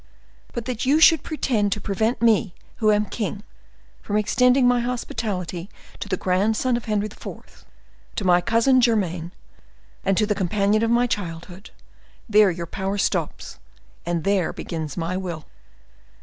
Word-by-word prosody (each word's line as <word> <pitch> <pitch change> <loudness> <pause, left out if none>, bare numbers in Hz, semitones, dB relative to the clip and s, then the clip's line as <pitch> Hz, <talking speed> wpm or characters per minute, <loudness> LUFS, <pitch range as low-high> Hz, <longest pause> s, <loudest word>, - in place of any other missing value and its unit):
But 235 -2 -5
that 250 -1 -3
you 280 +4 +3
should 320 -2 +6
pretend 230 -10 -1
to - - -5
prevent 220 +4 -1
me, 215 -5 +3 0.2
who 215 -1 +3
am 210 0 +2
king, 210 -5 -4 0.6
from 205 - -2
extending 250 +4 +3
my 245 0 +3
hospitality 205 -7 -3 0.3
to 205 - -6
the 185 - 0
grandson 215 +8 +1
of 235 - -4
Henry 210 -1 0
IV., 215 - -10 0.5
to - - -3
my 180 -1 +5
cousin 235 +5 +3
german, 180 -8 0 0.8
to 215 - +2
the 210 - +1
companion 200 +2 +1
of 230 - +1
my 240 +1 +3
childhood—there 200 +2 -2
your 170 -1 -4
power 195 +3 -3
stops, - - -2 0.4
and 170 -1 -2
there 195 -4 +1
begins 160 -3 -6
my 170 +1 -2
will." 175 -5 -5
210 Hz, 145 wpm, -23 LUFS, 185-235 Hz, 0.8 s, should